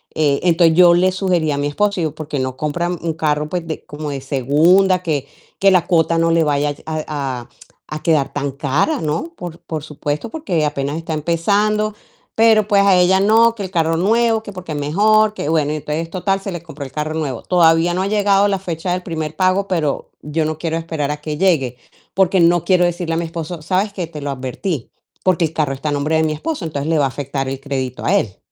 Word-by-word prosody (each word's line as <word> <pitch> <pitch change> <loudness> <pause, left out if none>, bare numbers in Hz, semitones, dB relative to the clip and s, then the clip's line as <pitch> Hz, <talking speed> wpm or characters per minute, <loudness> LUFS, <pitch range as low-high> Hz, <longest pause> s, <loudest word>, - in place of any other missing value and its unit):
eh, 145 -3 +2
entonces 170 -2 +4
yo 175 -1 +7
le 185 +2 +3
sugerí 180 -5 0
a 140 - -1
mi 145 - 0
esposo, 200 +4 0
digo: 155 -1 -2
"¿Por 155 -2 -7
qué 145 -3 -3
no 130 0 -3
compran 170 +4 -2
un 165 -1 -2
carro, 150 -1 0
pues, 175 -2 -3
de 155 - -6
como 150 0 -6
de 135 -2 -4
segunda?, 165 +8 +3
que 145 -4 -2 0.3
que 195 - +5
la 180 -3 +3
cuota 165 -1 +2
no 165 0 +2
le 165 -1 +3
vaya 145 0 0
a 155 -1 -3
a 135 -5 -4 0.4
a 155 0 -7
quedar 155 -5 +1
tan 140 -1 -2
cara", 155 - 0
¿no? 160 - -2
Por 170 -2 -7
por 155 -2 -5
supuesto, 150 +6 -4
porque 180 - -1
apenas 145 +1 -2
está 165 -1 -4
empezando, 205 +7 +1 0.4
pero, 220 -2 +4
pues, 200 -2 +4
a 195 -2 +5
ella: 180 +1 +4
"No, 225 +3 +4
que 210 - -7
el 185 - -5
carro 165 -2 +1
nuevo, 225 +4 +2
que 205 - -8
porque 185 -3 -8
es - - -3
mejor, 215 +8 +3
que". - - -4
Bueno, 155 -2 +1
y - - -2
entonces, 155 +3 -4
total, 195 +2 -1
se 195 - -5
le 170 -1 -6
compró 150 -4 -8
el 135 - -10
carro 155 +2 -3
nuevo. 140 -7 -3
Todavía 170 -1 +3
no 185 - -1
ha 195 - -1
llegado 200 -1 +3
la 195 -1 0
fecha 175 -1 -4
del 180 - -3
primer 160 -3 -4
pago, 190 +1 +1
pero 160 -7 -1
yo 155 +2 -2
no 155 0 -2
quiero 165 0 -2
esperar 160 -3 -3
a 150 0 -5
que 150 -1 -4
llegue, 140 -10 +1 0.4
porque 190 0 +3
no 170 0 +3
quiero 180 -1 +4
decirle 175 -1 -2
a - - 0
mi 170 - -1
esposo: 165 0 -6
"¿Sabes 190 +5 0
qué? 180 -5 -4
Te 155 -3 -9
lo 140 - -3
advertí", 135 - -4 0.3
porque 185 -2 +2
el 155 - -5
carro 150 -4 0
está 135 +3 -5
a - - -1
nombre 150 +3 0
de 160 - +2
mi 155 -1 0
esposo, 210 - -4
entonces 145 -1 -3
le 165 - +2
va 140 - +3
a - - 0
afectar 135 +1 -4
el 135 0 -4
crédito 130 -2 -4
a 190 - +2
él. 110 - -1
165 Hz, 235 wpm, -18 LUFS, 150-185 Hz, 0.4 s, yo